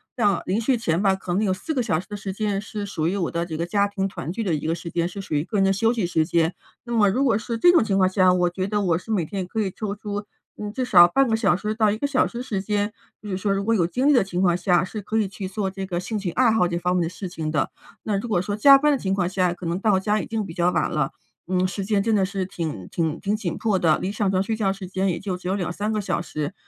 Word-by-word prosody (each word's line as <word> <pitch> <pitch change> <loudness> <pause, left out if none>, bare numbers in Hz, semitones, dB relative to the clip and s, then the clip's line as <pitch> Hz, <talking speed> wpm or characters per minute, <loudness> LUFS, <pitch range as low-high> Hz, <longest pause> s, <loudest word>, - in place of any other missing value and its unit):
像 205 -7 +2
临 200 +5 0
睡 245 +2 +2
前 170 -6 0
吧， 195 -2 +3
可 180 -2 -5
能 205 +4 +1
有 190 -2 +2
4 250 +12 -4
个 255 -4 0
小 165 -8 0
时 - - -9
的 205 - -6
时 200 -1 -5
间 200 0 -1
是 210 0 -5
属 160 -5 -2
于 200 - -2
我 175 -4 -1
的 170 0 -1
这 160 -2 -5
个 170 - -1
家 200 +3 +1
庭 195 -1 -1
团 165 -4 -6
聚 215 - -4
的 175 -6 0
一 150 - -5
个 160 - +1
时 170 0 -7
间， 170 0 0
是 200 - -8
属 195 -5 -6
于 145 - +1
个 210 - -3
人 195 - +4
的 195 - +3
休 225 +4 +2
息 225 -6 -1
时 160 -2 +1
间。 170 0 +1 0.3
那 240 - -4
么 205 -3 +4
如 260 +8 +1
果 225 -6 +3
是 230 +1 -4
这 350 +9 +6
种 335 - +5
情 200 -3 0
况 190 -1 +4
下， 185 -1 +4
我 180 -1 +2
觉 185 +2 -3
得 210 0 0
我 175 -4 +2
是 205 +6 -8
每 190 -7 +1
天 190 +3 -4
可 220 - -4
以 195 -3 0
抽 205 0 -4
出， 205 0 -5 0.3
嗯， 210 0 -5
至 255 +3 -2
少 175 -7 +8
半 270 +9 +2
个 225 - +2
小 200 -6 +2
时 210 +3 -2
到 215 -1 +2
1 210 - 0
个 285 - -2
小 275 -2 +2
时 235 - -9
的 250 - -4
时 205 -6 -2
间， 205 +1 -1 0.3
就 210 - -8
是 185 - -2
说 200 +1 -1
如 195 0 -1
果 230 - +2
有 175 -6 +2
精 255 +10 0
力 295 - +6
的 245 -6 +5
情 180 -2 -4
况 175 -2 +3
下， 180 -1 +2
是 210 +3 -5
可 215 +2 -2
以 215 -3 +2
去 195 0 -6
做 195 +1 -2
这 195 0 -6
个 175 -2 -2
兴 215 +4 -3
趣 195 -3 -3
爱 250 -3 +3
好 220 -5 +3
这 170 0 -2
方 180 +1 0
面 180 - +2
的 165 - -2
事 185 +1 -7
情 160 -3 -4
的。 155 -1 0 0.3
那 210 -2 -1
如 240 - -5
果 200 -5 +2
说 205 +3 -2
加 275 +6 +8
班 300 +2 +3
的 285 - +2
情 190 -1 -1
况 180 -3 0
下， 185 -1 +1
可 175 0 -9
能 170 +2 -1
到 200 -2 +3
家 210 +2 +1
已 - - -7
经 220 -2 -2
比 165 - -8
较 175 +1 +2
晚 180 - 0
了， 150 -3 0 0.4
嗯， 185 0 +1
时 195 +1 -4
间 200 0 +1
真 225 +1 +1
的 195 - +3
是 190 -1 -2
挺 155 - -5
挺 160 -3 -1
挺 205 +1 -1
紧 200 -6 -3
迫 210 -4 +1
的， 160 -3 +3
离 190 - -3
上 205 -1 0
床 190 0 +1
睡 220 +3 -2
觉 205 -3 +1
时 195 -1 -6
间 190 +1 -1
也 170 - -1
就 195 -2 -3
只 180 - -8
有 190 - +1
2-3 200 +3 -2
个 215 - 0
小 185 -4 -1
时。 155 0 -4
195 Hz, 340 characters per minute, -23 LUFS, 180-215 Hz, 0.4 s, 少